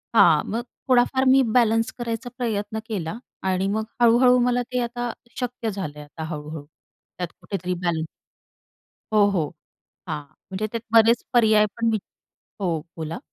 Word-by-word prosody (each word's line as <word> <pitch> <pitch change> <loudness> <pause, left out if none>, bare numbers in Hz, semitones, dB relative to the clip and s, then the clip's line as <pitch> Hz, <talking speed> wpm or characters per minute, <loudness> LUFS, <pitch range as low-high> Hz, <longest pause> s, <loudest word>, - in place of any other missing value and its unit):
हां, 160 -7 +6
मग 230 +3 -1 0.3
थोडाफार 255 +1 +3
मी 270 0 +6 0.2
बॅलन्स 225 -1 +3
करायचा 240 +1 -3
प्रयत्न 220 -3 -2
केला 200 -2 -4 0.3
आणि 190 0 +1
मग 215 +2 0 0.2
हळू-हळू 245 +2 +6
मला 245 0 +2
ते 250 - +2
आता 240 0 -3 0.3
शक्य 245 -2 -3
झालं 150 -7 -5
आता 160 +2 -8
हळू-हळू. 150 0 -6 0.6
त्यात 180 - -1
कुठेतरी 180 -2 -3
बॅलन्स 160 -2 0 1.1
हो, 210 -1 +6
हो, 165 -7 0 0.6
हां, 150 - -3 0.3
म्हणजे 200 +3 -2
त्यात 230 -1 -3
बरेच 230 +1 +6
पर्याय 215 -3 +5
पण 230 0 +2
वी 220 - +2 0.6
हो, 170 -5 0 0.2
बोला? 160 +5 -4
220 Hz, 145 wpm, -24 LUFS, 180-240 Hz, 1.1 s, हां